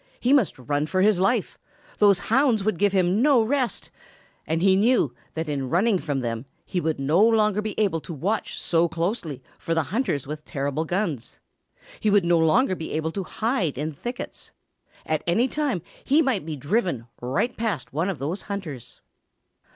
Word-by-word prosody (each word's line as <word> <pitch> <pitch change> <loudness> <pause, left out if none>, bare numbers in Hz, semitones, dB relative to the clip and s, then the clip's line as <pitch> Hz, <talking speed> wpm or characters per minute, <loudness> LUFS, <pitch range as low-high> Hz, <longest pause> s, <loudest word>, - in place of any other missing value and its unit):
He 250 +3 +2
must 265 -9 +3
run 145 +4 -1
for 185 +3 +1
his 210 -3 +4
life! 195 +3 0 0.4
Those 205 -2 +6 0.2
hounds 250 -6 +3
would 215 -4 0
give 205 0 +3
him 185 +2 +2
no 270 -4 +5
rest. 255 +1 -1 0.6
And 165 +2 0
he 190 -1 +5
knew 210 - +3 0.2
that 160 0 -3
in 140 -3 -2
running 190 - +2
from 145 -5 -2
them, 115 +1 -4 0.2
he 180 - -2
would 160 -2 -1
no 155 +9 +3
longer 215 -2 +3
be 215 0 -4
able 195 -6 +2
to 170 - -8
watch 200 +9 -2
so 170 0 +2
closely 165 - -3 0.2
for 165 - -2
the 165 - +2
hunters 220 - 0
with 150 +2 -6
terrible 145 +1 -2
guns. 165 - -3 0.6
He 215 - +1
would 200 -3 +4
no 170 -1 +4
longer 185 - +3
be 165 -3 -5
able 160 +1 -1
to 195 +3 -3
hide 205 - -1
in 155 +3 -2
thickets. 240 - -7 0.5
At 155 -1 -1
any 225 +9 +3
time 275 - -1 0.2
he 295 +4 +4
might 225 - -1
be 155 - -3
driven 145 - -1 0.2
right 135 - -1
past 210 - -3
one 165 +6 0
of 190 - -3
those 155 +9 -3
hunters. 165 - -6
180 Hz, 180 wpm, -24 LUFS, 155-215 Hz, 0.6 s, Those